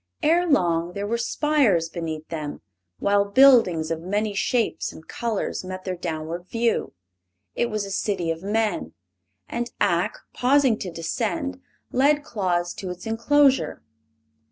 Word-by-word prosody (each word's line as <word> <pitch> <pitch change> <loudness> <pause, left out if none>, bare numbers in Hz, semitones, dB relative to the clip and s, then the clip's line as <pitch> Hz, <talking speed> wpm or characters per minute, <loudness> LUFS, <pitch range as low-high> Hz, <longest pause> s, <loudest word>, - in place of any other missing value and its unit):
Ere 345 +3 +3
long 175 - +2
there 200 +1 -3
were 230 +3 -1
spires 235 - +2
beneath 160 -2 -5
them, 155 -3 -5 0.4
while 200 0 +3
buildings 200 -8 +5
of 165 0 -2
many 205 +4 -1
shapes 230 +3 0
and 160 - -14
colors 230 -6 -3
met 185 0 -6
their 185 -1 -3
downward 170 0 -5
view. 230 +2 0 0.6
It 240 - 0
was 215 -2 -2
a 195 - -7
city 190 -4 -1
of 165 0 -5
men, 205 - -1 0.5
and 240 +1 -3
Ak, 175 -3 +1 0.2
pausing 260 -3 +3
to 185 - -5
descend, 235 - -3 0.3
led 290 +3 +3
Claus 175 -7 -1
to 190 - -6
its 180 0 -7
inclosure. 270 +5 +2
200 Hz, 140 wpm, -24 LUFS, 175-240 Hz, 0.6 s, buildings